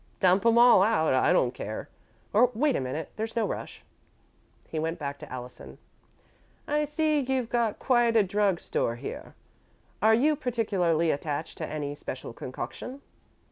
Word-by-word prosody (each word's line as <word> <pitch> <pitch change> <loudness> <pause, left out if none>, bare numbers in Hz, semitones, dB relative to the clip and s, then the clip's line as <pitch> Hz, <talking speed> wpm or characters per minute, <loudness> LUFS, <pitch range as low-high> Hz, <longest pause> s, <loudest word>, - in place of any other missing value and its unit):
"Dump 185 +1 +4
'em 230 0 +4
all 240 -5 +7
out 195 -8 +3
I 130 +5 +3
don't 130 -9 +2
care. 110 +1 -6 0.5
Or, 235 +4 +5
wait 280 +3 +2
a - - +1
minute; 135 +5 -4
there's 220 +1 -4
no 230 - +1
rush." - - -6 0.8
He 160 - -4
went 165 +2 -2
back 140 -1 -5
to - - -11
Allison. 125 -1 -9 0.9
"I 300 +1 +1
see 305 0 +1
you've 260 -3 -1
got 235 -3 0
quite 240 -3 +2
a 220 - +6
drug 195 -2 +1
store 115 - -1
here. 120 - -8 0.7
Are 220 +1 +5
you 295 +6 +3
particularly 195 - +1
attached 150 +2 -4
to 155 - -3
any 145 -2 -4
special 130 -4 -7
concoction?" 130 - -7
200 Hz, 160 wpm, -27 LUFS, 150-240 Hz, 0.9 s, all